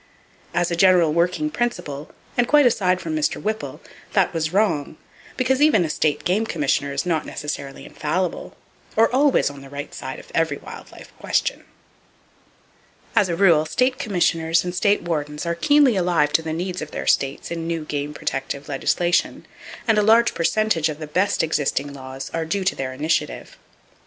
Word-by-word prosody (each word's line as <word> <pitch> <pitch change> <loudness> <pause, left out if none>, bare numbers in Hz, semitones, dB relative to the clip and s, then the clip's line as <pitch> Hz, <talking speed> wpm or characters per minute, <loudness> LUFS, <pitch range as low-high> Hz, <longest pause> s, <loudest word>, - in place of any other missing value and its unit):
As 175 0 +1
a - - +1
general 175 -3 +4
working 180 - +1
principle, 155 - -3 0.3
and 245 -1 +2
quite 295 0 +5
aside 185 -6 +2
from 160 -3 -4
Mr. 155 -1 0
Whipple, 215 +1 -4 0.3
that - - +2
was 160 -1 -1
wrong; 175 -7 0 0.4
because 260 +1 +1
even 295 - +5
a 155 - -2
State 150 -2 0
game 195 +5 +1
commissioner 145 -4 0
is 140 0 -2
not 165 -3 0
necessarily 140 -2 -6
infallible, 175 +4 -3 0.4
or 225 +2 +3
always 270 - +3
on 140 -1 -12
the 135 - -12
right 145 +1 -7
side - - -6
of - - -13
every - - +1
wild - - -11
life - - -14
question. - - -1 1.5
As 195 - +3
a 170 - 0
rule, 170 -4 +5
state 255 +8 +1
commissioners 165 -5 +1
and 180 0 -4
state 200 +2 +2
wardens 150 -2 -3
are 170 - 0
keenly 285 - +4
alive 175 -5 +1
to - - +4
the 160 -1 -4
needs 180 +3 -3
of 155 - -5
their - - -5
states 135 +4 0
in 165 -1 -4
new 165 -2 -3
game 145 0 -3
protective 135 +1 -4
legislation, 175 +5 0 0.4
and 220 -2 +4
a - - +4
large 225 +3 +4
percentage 170 -2 +1
of 150 - -5
the 155 - -6
best 180 +6 +1
existing 145 -2 -1
laws 135 0 -8
are 165 0 -1
due 190 +4 -1
to 185 - +1
their 130 -1 -4
initiative. 150 +5 -2
170 Hz, 175 wpm, -22 LUFS, 150-200 Hz, 1.5 s, quite